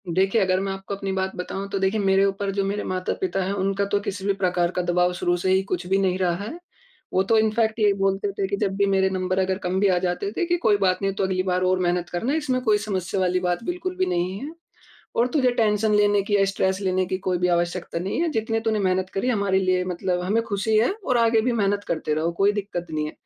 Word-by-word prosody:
देखिए, 195 +4 +3
अगर 185 -1 +2
मैं 195 0 -2
आपको 195 +1 -5
अपनी 195 0 -4
बात 190 0 -2
बताऊँ 195 +2 -5
तो 195 - -2
देखिए 190 +3 +1
मेरे 195 -1 +3
ऊपर 195 0 -1
जो 200 - +1
मेरे 200 +1 -2
माता-पिता 185 0 -2
हैं, 190 +2 -2
उनका 195 0 0
तो 200 0 0
किसी 200 -1 -5
भी 200 - +2
प्रकार 180 -2 0
का 180 - -1
दबाव 180 0 +1
शुरू 175 0 0
से 185 +2 0
ही 190 0 +4
कुछ 180 -2 -3
भी 190 +1 +2
नहीं 190 -2 +1
रहा 180 -2 +1
है। 275 +12 -7 0.5
वो 190 - +3
तो 225 +3 +2
इनफैक्ट 220 +1 +1
ये 210 -1 +4
बोलते 195 +1 0
थे 195 -1 -2
कि 200 - -1
जब 195 -2 0
भी 200 - +3
मेरे 190 -1 +2
नंबर 185 0 -1
अगर 190 0 0
कम 180 +1 0
भी 200 - +3
आ 185 -2 +3
जाते 180 +2 -2
थे, 345 - -1
कि 350 0 +1
कोई 215 -11 +3
बात 190 -1 +1
नहीं 195 0 0
तू - - -1
अगली 185 -1 0
बार 180 -1 0
और 185 0 +2
मेहनत 175 -1 0
करना 230 +11 -1
इसमें 260 -5 0
कोई 215 -4 +3
समस्या 195 -3 -3
वाली 180 0 +1
बात 180 +2 -1
बिल्कुल 365 +4 -3
भी 370 - +2
नहीं 180 - -1
है 290 +4 -6 0.7
और 235 - +3
तुझे 260 -5 +3
टेंशन 215 -2 +2
लेने 205 -1 +3
की 205 +1 +1
या 195 - +4
स्ट्रेस 190 -1 0
लेने 185 -1 +1
की 185 - -2
कोई 185 -1 -1
भी 180 - +1
आवश्यकता 175 0 -1
नहीं 190 - -2
है, 340 - +1
जितने 225 -3 -1
तूने 220 -1 0
मेहनत 185 -1 0
करी 195 +6 -1
हमारे 200 -5 +1
लिए 185 -1 +1
मतलब 180 0 -2
हमें 210 +5 +1
खुशी 215 0 -1
है 225 - +3
और 255 - +1
आगे 230 -1 +4
भी 245 +3 0
मेहनत 205 -2 0
करते 155 -2 -1
रहो 160 +2 0
कोई 195 +4 +2
दिक्कत 200 -4 -4
नहीं 155 -1 -2
है। - - -6
195 Hz, 260 wpm, -24 LUFS, 185-210 Hz, 0.7 s, ही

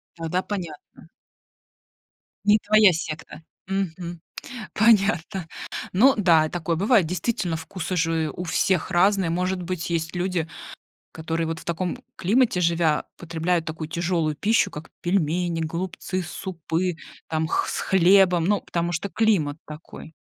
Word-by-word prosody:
Тогда 165 +2 -1
понятно. 175 -7 -7 1.4
Не 210 +1 +5
твоя 215 -2 +6
секта. 160 -1 -6 0.3
Мгм. 175 -3 -3 0.5
Понятно. 195 -5 +3 0.5
Ну 255 +9 +6
да, 170 -7 +4
и - - -4
такое 170 -1 -2
бывает, 200 -1 +3
действительно, 180 -1 -1
вкусы 170 +2 -5
же 160 -2 +1
у 180 - -4
всех 180 +1 +1
разные. 190 0 +3
Может 180 +2 -1
быть, 175 -1 -4
есть 165 +1 -2
люди, 175 -2 -1 0.6
которые 165 +1 -2
вот 160 0 -4
в - - -14
таком 175 +6 -2 0.2
климате 220 0 +2
живя, 165 -3 +2
потребляют 170 0 -1
такую 155 -1 -5
тяжелую 170 -2 0
пищу, 205 0 +2
как 150 +2 -9
пельмени, 175 -1 0
голубцы, 180 +3 -3
супы 175 0 -3 0.3
там 160 0 0
х - - 0
с - - -2
хлебом. 185 -2 +4
Ну, 205 +1 +2
потому 170 0 -2
что 175 +4 -2
климат 185 -10 +1
такой. 155 +1 -11
175 Hz, 135 wpm, -24 LUFS, 160-190 Hz, 1.4 s, твоя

